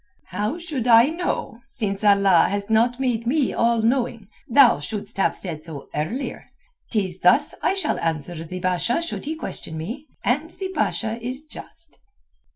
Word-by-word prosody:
"How 210 Hz, -, -2 dB
should 305 Hz, -9 st, -4 dB
I 235 Hz, +3 st, +7 dB
know, 330 Hz, -8 st, -3 dB
since 205 Hz, -6 st, -3 dB
Allah 200 Hz, -4 st, +5 dB
has 200 Hz, +2 st, -3 dB
not 240 Hz, +3 st, +3 dB
made 240 Hz, -3 st, -1 dB
me 280 Hz, 0 st, +2 dB
all 230 Hz, -1 st, +2 dB
knowing? 235 Hz, -3 st, 0 dB, 0.2 s
Thou 250 Hz, -, +6 dB
shouldst 200 Hz, +8 st, -5 dB
have 195 Hz, -, +2 dB
said 160 Hz, -5 st, -5 dB
so 155 Hz, -4 st, -7 dB
earlier. 165 Hz, -, -4 dB, 0.4 s
'Tis 190 Hz, -5 st, -1 dB
thus 275 Hz, +13 st, +4 dB
I 385 Hz, -, +2 dB
shall 390 Hz, -, 0 dB
answer 165 Hz, 0 st, -2 dB
the 180 Hz, +3 st, -6 dB
Basha 185 Hz, -, +1 dB
should 335 Hz, -, -5 dB
he 310 Hz, +2 st, -2 dB
question 160 Hz, -, -7 dB
me, 235 Hz, -, -6 dB, 0.2 s
and 295 Hz, +6 st, +1 dB
the 380 Hz, +2 st, -6 dB
Basha 230 Hz, -6 st, -1 dB
is 255 Hz, +5 st, -4 dB
just." 315 Hz, +1 st, -11 dB
230 Hz, 160 wpm, -23 LUFS, 190-275 Hz, 0.4 s, I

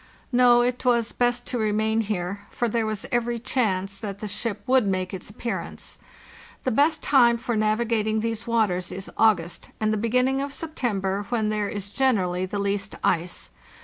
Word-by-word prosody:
No, 245 Hz, -1 st, +6 dB
it 245 Hz, 0 st, -1 dB
was 235 Hz, -3 st, +2 dB
best 245 Hz, 0 st, 0 dB
to 245 Hz, -, -2 dB
remain 220 Hz, +1 st, +1 dB
here, 200 Hz, -1 st, -3 dB
for 240 Hz, -, -1 dB
there 225 Hz, 0 st, 0 dB
was 215 Hz, -2 st, -2 dB
every 240 Hz, 0 st, 0 dB
chance 200 Hz, -5 st, -1 dB
that 200 Hz, -3 st, -5 dB
the 210 Hz, -, -5 dB
ship 205 Hz, +1 st, -3 dB
would 255 Hz, -4 st, +3 dB
make 185 Hz, -1 st, -1 dB
its 190 Hz, 0 st, -5 dB
appearance. 230 Hz, +2 st, -5 dB, 0.6 s
The 260 Hz, -, 0 dB
best 295 Hz, +6 st, +2 dB
time 240 Hz, -4 st, +5 dB
for 235 Hz, 0 st, -2 dB
navigating 215 Hz, 0 st, +1 dB
these 230 Hz, 0 st, -3 dB
waters 205 Hz, -6 st, +1 dB
is 195 Hz, 0 st, -5 dB
August 180 Hz, -6 st, +2 dB
and 215 Hz, 0 st, +1 dB
the -, -, 0 dB
beginning 250 Hz, +5 st, +1 dB
of 280 Hz, 0 st, -4 dB
September, 205 Hz, -, -2 dB
when 225 Hz, -3 st, 0 dB
there 210 Hz, -1 st, -1 dB
is 200 Hz, -1 st, -4 dB
generally 185 Hz, -9 st, +1 dB
the 205 Hz, -, -4 dB
least 200 Hz, 0 st, -2 dB
ice. 175 Hz, 0 st, 0 dB
220 Hz, 175 wpm, -25 LUFS, 200-240 Hz, 0.6 s, No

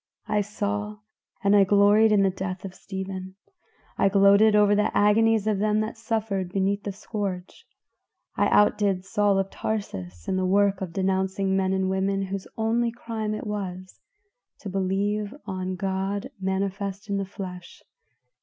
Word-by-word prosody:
I 210 Hz, -1 st, +1 dB
saw 210 Hz, 0 st, -3 dB, 0.5 s
and 200 Hz, 0 st, +4 dB
gloried 205 Hz, +2 st, +5 dB
in 205 Hz, -2 st, +4 dB
the 195 Hz, -, +3 dB
death 185 Hz, 0 st, -5 dB
of 190 Hz, -, -7 dB
Stephen; 190 Hz, -1 st, -6 dB, 0.6 s
I 195 Hz, -, +4 dB
gloated 200 Hz, +2 st, +5 dB
over 205 Hz, -1 st, +5 dB
the 210 Hz, +1 st, +2 dB
agonies 220 Hz, +1 st, +4 dB
of 215 Hz, -2 st, +1 dB
them 210 Hz, +1 st, +2 dB
that 215 Hz, +1 st, -4 dB
suffered 220 Hz, -5 st, -2 dB
beneath 195 Hz, +1 st, 0 dB
the 205 Hz, -, -4 dB
scourge; 195 Hz, -2 st, -5 dB, 0.7 s
I -, -, +2 dB
outdid 205 Hz, -3 st, +3 dB
Saul 205 Hz, -1 st, +2 dB
of 195 Hz, 0 st, -1 dB
Tarsus 90 Hz, -, -5 dB
in 185 Hz, -, 0 dB
the 185 Hz, -, 0 dB
work 200 Hz, 0 st, +2 dB
of 185 Hz, -3 st, -4 dB
denouncing 190 Hz, +1 st, 0 dB
men 190 Hz, -1 st, +1 dB
and 190 Hz, 0 st, 0 dB
women 195 Hz, +1 st, 0 dB
whose 195 Hz, 0 st, -5 dB
only 230 Hz, +1 st, +1 dB
crime 225 Hz, -2 st, -4 dB
it -, -, -6 dB
was 185 Hz, -3 st, -5 dB, 0.6 s
to 205 Hz, -, -6 dB
believe 200 Hz, +3 st, -1 dB
on 185 Hz, 0 st, -3 dB
God 195 Hz, +5 st, -2 dB
manifest 195 Hz, +1 st, -3 dB
in 200 Hz, -1 st, -1 dB
the 195 Hz, -, -1 dB
flesh. 185 Hz, -2 st, -9 dB
200 Hz, 155 wpm, -25 LUFS, 190-210 Hz, 0.7 s, gloried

